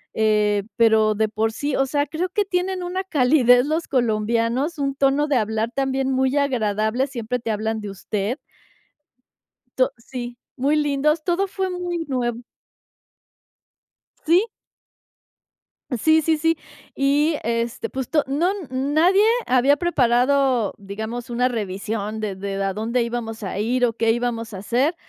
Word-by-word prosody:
eh, 210 Hz, -2 st, +2 dB
pero 220 Hz, -2 st, +4 dB
de 220 Hz, +1 st, +1 dB
por 220 Hz, +1 st, 0 dB
sí, 285 Hz, +2 st, -2 dB
o 270 Hz, -, +2 dB
sea, 285 Hz, +1 st, 0 dB
creo 330 Hz, +5 st, -2 dB
que 410 Hz, +2 st, 0 dB
tienen 365 Hz, 0 st, -1 dB
una 370 Hz, +2 st, -3 dB
calidez 250 Hz, -6 st, +4 dB
los 320 Hz, +2 st, -1 dB
colombianos, 235 Hz, +5 st, 0 dB
un 275 Hz, -1 st, -1 dB
tono 280 Hz, +2 st, +2 dB
de 285 Hz, -, +1 dB
hablar 220 Hz, +1 st, -1 dB
también 270 Hz, -1 st, 0 dB
muy 265 Hz, +2 st, +1 dB
agradable. 230 Hz, -2 st, +1 dB
Siempre 250 Hz, -2 st, -3 dB
te 230 Hz, -2 st, -3 dB
hablan 220 Hz, +1 st, -2 dB
de 205 Hz, -1 st, -6 dB
usted. 205 Hz, +5 st, -3 dB, 1.4 s
To 255 Hz, -, +3 dB
sí, 240 Hz, +1 st, -7 dB, 0.2 s
muy 280 Hz, +3 st, +1 dB
lindos. 300 Hz, +2 st, +1 dB
Todo 370 Hz, +2 st, 0 dB
fue 380 Hz, 0 st, -2 dB
muy 350 Hz, -2 st, -3 dB
nuevo. 240 Hz, -3 st, -2 dB, 1.8 s
Sí. 350 Hz, +7 st, +4 dB, 1.6 s
Sí, 315 Hz, 0 st, +5 dB
sí, 320 Hz, 0 st, +2 dB
sí. 325 Hz, +1 st, +2 dB, 0.4 s
Y, 290 Hz, +3 st, +2 dB
este, 230 Hz, +1 st, -2 dB
pues 265 Hz, -2 st, -4 dB
to 300 Hz, -2 st, +2 dB
no 285 Hz, +6 st, 0 dB, 0.2 s
nadie 310 Hz, +9 st, +3 dB, 0.2 s
había 260 Hz, +3 st, +3 dB
preparado, 255 Hz, -, +2 dB
digamos, 220 Hz, +5 st, -6 dB
una 245 Hz, +1 st, +1 dB
revisión 215 Hz, -1 st, -3 dB
de 210 Hz, -3 st, -3 dB
de 195 Hz, +1 st, -4 dB
a 195 Hz, -, -1 dB
dónde 230 Hz, +4 st, 0 dB
íbamos 230 Hz, -2 st, -4 dB
a 195 Hz, 0 st, -4 dB
ir 245 Hz, +4 st, +2 dB
o 235 Hz, -, 0 dB
qué 225 Hz, 0 st, +2 dB
íbamos 230 Hz, -2 st, -2 dB
a -, -, -5 dB
hacer. 245 Hz, -, 0 dB
250 Hz, 145 wpm, -22 LUFS, 220-290 Hz, 1.8 s, Sí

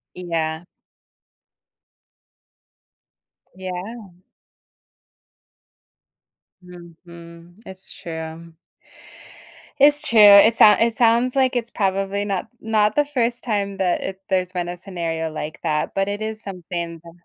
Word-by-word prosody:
Yeah. 165 Hz, -2 st, -3 dB, 2.9 s
Yeah. 190 Hz, +4 st, -7 dB, 2.5 s
Mhm, 170 Hz, -1 st, -14 dB
it's 190 Hz, 0 st, -9 dB
true. 160 Hz, 0 st, -8 dB, 1.3 s
It's 295 Hz, +2 st, +5 dB
true, 225 Hz, -2 st, +4 dB
it 205 Hz, +2 st, +8 dB
sound 215 Hz, -2 st, +6 dB
it 230 Hz, 0 st, +2 dB
sounds 235 Hz, +2 st, +2 dB
like 260 Hz, -1 st, +1 dB
it's 235 Hz, -1 st, -2 dB
probably 195 Hz, 0 st, -1 dB
not 195 Hz, -3 st, -3 dB
not 215 Hz, -1 st, +1 dB
the 295 Hz, -, +2 dB
first 245 Hz, -4 st, -2 dB
time 200 Hz, -4 st, -2 dB
that 185 Hz, -2 st, 0 dB
it 190 Hz, 0 st, -6 dB
there's 185 Hz, -1 st, 0 dB
been 175 Hz, -1 st, -3 dB
a 175 Hz, -, -5 dB
scenario 165 Hz, -3 st, -4 dB
like 155 Hz, 0 st, -6 dB
that, 150 Hz, 0 st, -2 dB
but 195 Hz, 0 st, +1 dB
it 205 Hz, +1 st, -4 dB
is 220 Hz, 0 st, -4 dB
something 175 Hz, -4 st, -6 dB
to 170 Hz, +1 st, -14 dB
190 Hz, 110 wpm, -21 LUFS, 170-220 Hz, 2.9 s, it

